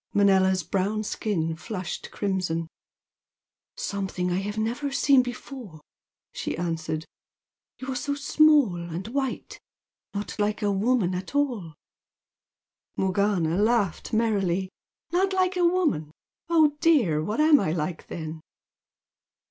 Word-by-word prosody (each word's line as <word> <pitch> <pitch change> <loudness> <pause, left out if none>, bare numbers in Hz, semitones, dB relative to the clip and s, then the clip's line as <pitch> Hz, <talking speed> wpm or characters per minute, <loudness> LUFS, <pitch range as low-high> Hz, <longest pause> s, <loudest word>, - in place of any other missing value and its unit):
Manella's 190 -2 +4
brown 200 +5 -1
skin 165 -7 -1
flushed 185 +1 -5
crimson. 185 -5 -2 1.1
"Something 190 -2 -2
I 175 - +1
have 205 +2 -4
never 240 +6 -1
seen 275 -1 +5
before!" 245 - -8 0.5
she - - -3
answered 165 -2 -2 0.7
"You 260 - -7
are - - -3
so 285 +2 -2
small 290 -8 +4
and 170 +3 -5
white! 265 0 -3 0.6
Not 205 +1 -4
like 210 +1 0
a 205 - +2
woman 200 -1 +1
at 185 +9 -5
all!" 235 - -1 1.2
Morgana 190 -3 +1
laughed 215 -5 +1
merrily. 195 -5 +1 0.4
"Not 380 +2 +2
like 370 0 +2
a 360 - +1
woman! 310 - 0 0.4
Oh 310 -3 +4
dear! 245 - +3
What 210 - -2
am 305 -1 +6
I 185 - 0
like 160 0 -3
then?" 160 -1 -6
205 Hz, 120 wpm, -26 LUFS, 175-260 Hz, 1.2 s, am